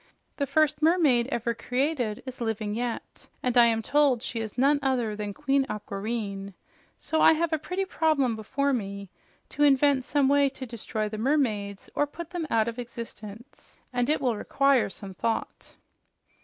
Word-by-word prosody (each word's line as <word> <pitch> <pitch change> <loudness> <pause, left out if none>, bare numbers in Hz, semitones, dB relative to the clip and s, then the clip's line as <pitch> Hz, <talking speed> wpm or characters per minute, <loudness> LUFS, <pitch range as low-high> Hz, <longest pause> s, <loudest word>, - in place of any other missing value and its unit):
The 280 - -1
first 305 0 +2
mermaid 305 -8 +4
ever 235 -3 -1
created 250 -2 -1
is 260 -1 -8
living 220 -2 -2
yet, 235 +1 -5 0.2
and 250 -1 0
I 240 -1 +7
am 225 -1 +1
told 280 -3 +2
she 235 - -4
is 220 +1 -5
none 280 +3 +4
other 250 -5 0
than 210 -1 -4
Queen 270 +7 +1
Aquareine. 200 -1 -4 0.4
So 315 - -1
I - - +7
have 325 +1 0
a 315 - +1
pretty 370 +5 -2
problem 305 -9 +1
before 275 +6 -1
me 200 -4 -4 0.4
to - - -6
invent 280 -1 +4
some 280 +1 +2
way 280 0 +4
to 265 -1 -8
destroy 220 -2 -4
the 215 0 -6
mermaids 215 -7 0
or 290 - +1
put 340 +3 -9
them 345 -3 -3
out 225 -1 +2
of 235 +1 -4
existence. 230 0 -10 0.2
And 245 +1 0
it 310 - +2
will 245 -4 0
require 275 +2 +2
some 195 0 -9
thought." 225 +4 -3
245 Hz, 170 wpm, -27 LUFS, 220-285 Hz, 0.4 s, I